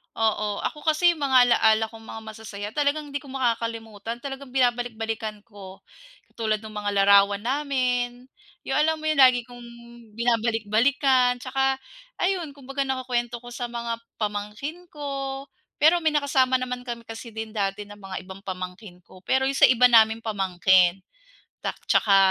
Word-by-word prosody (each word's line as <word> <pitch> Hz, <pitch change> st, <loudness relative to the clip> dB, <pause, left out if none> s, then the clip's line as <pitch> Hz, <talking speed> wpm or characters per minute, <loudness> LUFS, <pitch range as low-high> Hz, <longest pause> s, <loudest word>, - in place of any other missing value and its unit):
Oo. 215 Hz, -2 st, 0 dB
Ako 300 Hz, -, -3 dB
kasi 315 Hz, +3 st, +4 dB
mga 260 Hz, -4 st, +4 dB
alaala 220 Hz, -1 st, +4 dB
kong 225 Hz, -1 st, -13 dB
mga 225 Hz, -, -8 dB
masasaya 215 Hz, -2 st, -7 dB
talagang 295 Hz, +2 st, -1 dB
hindi 285 Hz, -, -2 dB
ko 285 Hz, -, -15 dB
makakalimutan, 230 Hz, -3 st, -3 dB
talagang 270 Hz, -2 st, -7 dB
binabalik-balikan 225 Hz, -4 st, -1 dB
ko. 200 Hz, -4 st, -13 dB, 0.5 s
Katulad 215 Hz, -2 st, -2 dB
nung 215 Hz, -1 st, -8 dB
mga 205 Hz, -1 st, -2 dB
larawan 200 Hz, 0 st, +5 dB
namin, 250 Hz, -2 st, -1 dB, 0.3 s
yung 270 Hz, -, -1 dB
alam 315 Hz, +1 st, +2 dB
mo -, -, -7 dB
yun, 310 Hz, -2 st, 0 dB
lagi 255 Hz, -2 st, +6 dB
kong 245 Hz, 0 st, -13 dB, 0.5 s
binabalik-balikan. 240 Hz, +3 st, +2 dB
Tsaka 270 Hz, +1 st, 0 dB, 0.5 s
ayun, 360 Hz, -6 st, -1 dB
kumbaga 275 Hz, 0 st, -4 dB
nakukuwento 245 Hz, -2 st, -2 dB
ko 240 Hz, -, -9 dB
sa 240 Hz, 0 st, -4 dB
mga 235 Hz, -1 st, -4 dB, 0.2 s
pamangkin 210 Hz, +11 st, -5 dB
ko. 275 Hz, -3 st, -5 dB, 0.3 s
Pero 335 Hz, +3 st, +4 dB
may 320 Hz, -, +3 dB
nakasama 275 Hz, -3 st, +2 dB
naman 250 Hz, -1 st, -4 dB
kami 235 Hz, -2 st, -7 dB
kasi 225 Hz, +1 st, -8 dB
din 220 Hz, -1 st, -7 dB
dati 200 Hz, -1 st, -2 dB
ng 205 Hz, 0 st, -13 dB
mga 190 Hz, -1 st, -6 dB
ibang 190 Hz, +1 st, -10 dB
pamangkin 185 Hz, 0 st, -7 dB
ko, 185 Hz, -, -16 dB
pero 265 Hz, +7 st, +1 dB
yung 270 Hz, -, 0 dB
sa -, -, +6 dB
iba 250 Hz, 0 st, +5 dB
naming 225 Hz, -2 st, +5 dB
pamangkin. 190 Hz, -3 st, +3 dB, 0.6 s
Tak -, -, -4 dB, 0.2 s
tsaka 200 Hz, -2 st, +4 dB
240 Hz, 155 wpm, -25 LUFS, 215-270 Hz, 0.6 s, lagi